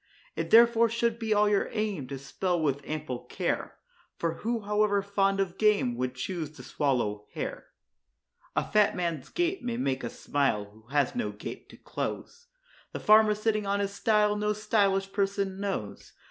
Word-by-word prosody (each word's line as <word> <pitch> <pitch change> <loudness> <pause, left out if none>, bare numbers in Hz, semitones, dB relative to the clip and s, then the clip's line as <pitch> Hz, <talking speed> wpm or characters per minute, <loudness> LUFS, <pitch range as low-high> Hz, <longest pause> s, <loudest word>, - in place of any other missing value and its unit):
It - - -3
therefore 235 0 +6
should 235 0 0
be 225 -2 -3
all 210 0 +4
your 205 -1 +2
aim 205 - -2
to 135 - -5
spell 175 +6 -2
with 140 -3 0
ample 150 -5 -4
care; - - -2 0.4
For 165 -1 -2
who, 230 +1 -2
however 210 -1 +1
fond 195 -1 +1
of 190 -3 -2
game, 205 - +3
would 125 +1 -2
choose 160 +3 -4
to 125 - -12
swallow 120 -7 -1
hair? - - -5 0.9
A - - 0
fat 210 -1 +3
man's 170 -6 -3
gait 350 +2 -1
may 240 -1 -2
make 135 - -1
us 120 - -6
smile, 135 -8 0
who 110 +2 -20
has 140 +1 +1
no 245 - -2
gate - - -8
to - - -14
close; 475 0 -5 0.5
The - - -4
farmer, 215 0 +6
sitting 215 -1 0
on 200 0 +1
his 200 0 -1
stile 210 0 +2
no 210 0 0
_sty_lish 195 -2 +1
person 195 -1 -1
knows. 195 - -4
200 Hz, 175 wpm, -28 LUFS, 145-215 Hz, 0.9 s, therefore